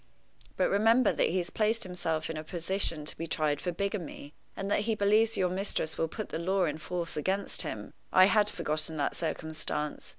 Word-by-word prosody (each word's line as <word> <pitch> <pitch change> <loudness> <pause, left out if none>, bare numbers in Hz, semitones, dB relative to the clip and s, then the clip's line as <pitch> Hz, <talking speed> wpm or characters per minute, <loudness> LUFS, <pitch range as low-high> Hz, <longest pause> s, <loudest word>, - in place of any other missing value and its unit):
But - - +2
remember 225 +4 +4
that - - +2
he 180 - 0
has 175 -2 -1
placed 225 +2 +2
himself 165 -4 -2
in 160 - -4
a 155 - -4
position 170 -1 -1
to - - 0
be 165 - -5
tried 150 -2 0
for 180 - -1
bigamy, 175 -6 -4 0.2
and 195 +1 -3
that - - +3
he 220 - +2
believes 215 +2 +3
your 185 - +3
mistress 185 -4 -1
will 165 - 0
put 215 +6 -6
the - - -3
law 190 +3 +1
in 155 -1 -2
force 170 +1 -4
against 190 +6 0
him." - - -6 0.2
I 185 - +8
had 210 +1 +4
forgotten 155 -1 -3
that 145 - 0
circumstance. 155 -2 -3
180 Hz, 200 wpm, -30 LUFS, 155-200 Hz, 0.2 s, I